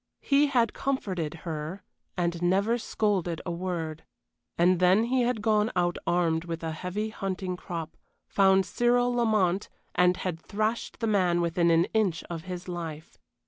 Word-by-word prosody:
He 285 +1 +4
had 240 -5 +2
comforted 185 - -2
her 160 +3 -5 0.3
and 170 -1 -1
never 200 +7 +2
scolded 190 -7 -1
a 175 - -2
word, 170 -3 -4 0.5
and 175 +1 +4
then 185 +4 +5
he 255 +2 +1
had 240 -3 0
gone 215 0 +2
out 175 -1 +1
armed 170 -2 +1
with 165 -1 -5
a 160 - -2
heavy 185 +7 -3
hunting 190 -3 -3
crop, 170 -3 -6 0.3
found 190 -1 +4
Cyril 245 +2 +2
Lamont, 215 -6 +1 0.2
and 180 0 +3
had 175 -3 -3
thrashed 215 +6 -2
the - - +1
man 185 -5 +2
within 170 0 +2
an 165 +1 +4
inch 200 -7 +1
of 165 0 -5
his 180 -1 -6
life. 165 -3 -6
185 Hz, 155 wpm, -28 LUFS, 170-215 Hz, 0.5 s, then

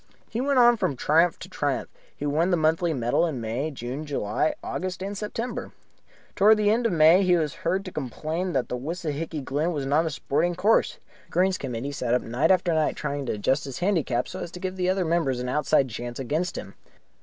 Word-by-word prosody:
He 230 - -3
went 280 0 +1
on 240 -1 +6
from 140 - 0
triumph 165 +6 +3
to - - -9
triumph. - - -2 0.3
He 145 - -4
won 155 +5 +1
the 175 - +3
monthly 160 +2 +2
medal 120 -2 +1
in 145 -6 -4
May, 115 +7 -2
June, 130 +1 -5
July, 145 - -1
August, 185 0 -4
and 200 +1 -4
September. 225 +4 -4 0.6
Towards 215 +2 +6
the 210 -1 +3
end 230 +2 +2
of - - -2
May 165 +2 +6
he 180 -2 +4
was 155 -4 0
heard 190 +4 0
to 185 - -6
complain 155 +6 -3
that 130 -3 0
Wissahicky 155 +2 -4
Glen 150 +6 0
was 145 -3 -3
not 150 +4 +2
a - - 0
sporting 160 +3 -1
course. 205 +5 +2 0.3
The - - -27
Greens 185 +2 +2
Committee 130 +1 -4
sat 125 -4 0
up 125 - 0
night 125 +8 0
after 180 -2 +3
night 155 -1 +1
trying 140 -2 -3
to - - 0
adjust 130 +8 0
his 135 -2 -6
handicap 165 -10 0
so - - -7
as - - -5
to 180 - -7
give 185 0 -4
other 185 0 +1
members 160 -6 +1
an 125 - -3
outside 150 0 +2
chance 120 +1 -6
against 150 +7 -2
him. - - -7
160 Hz, 215 wpm, -25 LUFS, 135-185 Hz, 0.6 s, on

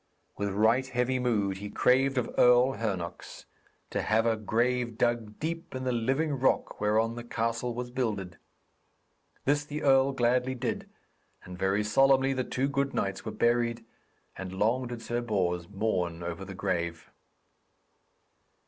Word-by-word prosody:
With 100 0 -2
right 110 +6 +2
heavy 125 +1 0
mood 105 -6 0
he 105 +1 -6
craved 135 +4 +3
of 125 - -1
Earl 125 +1 +6
Hernox 95 -8 -5 0.5
to - - -1
have 110 +1 +2
a 115 -1 +3
grave 120 +2 0
dug 115 -3 0
deep 165 0 -4
in 130 - -4
the 130 - 0
living 135 +6 0
rock 130 - +1
whereon 110 +2 +2
the 120 0 -7
castle 115 +1 -2
was 125 0 -5
builded. 105 -9 -3 1.1
This 145 +1 +2
the 150 +1 -5
earl 135 -1 +5
gladly 125 +1 +1
did, 125 0 -3 0.5
and 90 - -9
very 95 +3 +1
solemnly 135 +4 +4
the 130 -1 -1
two 130 +2 -1
good 140 0 -1
knights 95 -1 -2
were 110 - -3
buried, 120 +1 +1 0.5
and 95 0 -6
long 115 +6 +1
did 120 -1 -7
Sir 120 +1 -2
Bors 90 -6 -1
mourn 90 -5 -1
over 85 -1 -5
the - - -8
grave. 85 -1 -3
120 Hz, 150 wpm, -29 LUFS, 105-130 Hz, 1.1 s, Earl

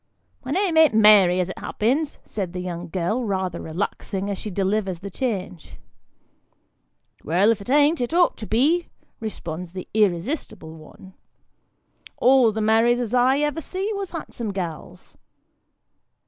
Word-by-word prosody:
" - - -43
My 255 - -8
name 355 +2 +1
an't 315 -8 +5
Mary 205 -4 +6
as 180 0 -1
it - - -9
happens," 275 +8 -1
says 195 -4 -4
the 180 - -4
young 175 -1 -5
girl, 195 +8 -1
rather 190 -5 -2
relaxing 195 +3 -4
as 195 - -4
she 215 - -6
delivers 195 -1 -1
the 200 0 -7
change. 185 - -4 0.7
" - - -42
Well, 185 +8 +3
if 220 - -2
it 200 - -10
an't, 295 +2 +3
it 240 - -2
ought 350 +1 +3
to 215 - -7
be," 305 +10 +2 0.3
responds 180 -5 -6
the 185 -1 -7
irresistible 200 - -1
one; 160 +4 -14 1.0
"all 255 -3 +5
the 220 +1 -3
Marys 225 +3 +3
as 240 -2 -3
ever 270 +4 +2
I - - -6
see, 385 +7 -3
was 395 -2 -4
handsome 245 -9 -6
gals." 175 -5 -7
215 Hz, 155 wpm, -23 LUFS, 185-260 Hz, 1.0 s, Mary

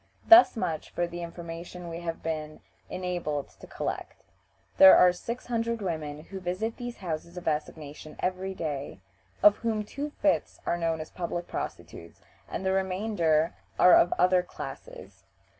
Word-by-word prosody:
Thus 340 -6 +8
much 165 -7 -3
for 175 - -1
the 175 0 -7
information 170 +1 -8
we 165 0 -6
have 165 -1 -5
been 155 -1 -4 0.3
enabled 175 -6 -3
to - - -12
collect. - - -5 0.5
There 190 0 +10
are 180 0 +6
six 235 +7 -6
hundred 230 -1 -1
women 155 -6 -4
who 190 +3 -8
visit 190 +5 -3
these 245 -1 -6
houses 170 -1 -5
of 180 - -7
assignation 150 0 -4
every 185 +1 -2
day, 145 - -4 0.4
of 210 0 +7
whom 220 -2 -1
two 280 +8 -5
fifths - - +1
are - - +1
known 165 -1 -1
as 155 - -9
public 175 -1 -4
prostitutes, 85 - -7 0.3
and 190 - -4
the 190 - +2
remainder 185 -4 +1 0.2
are 180 - +7
of 175 - +5
other 180 0 +4
classes. - - -10
175 Hz, 155 wpm, -28 LUFS, 160-190 Hz, 0.5 s, There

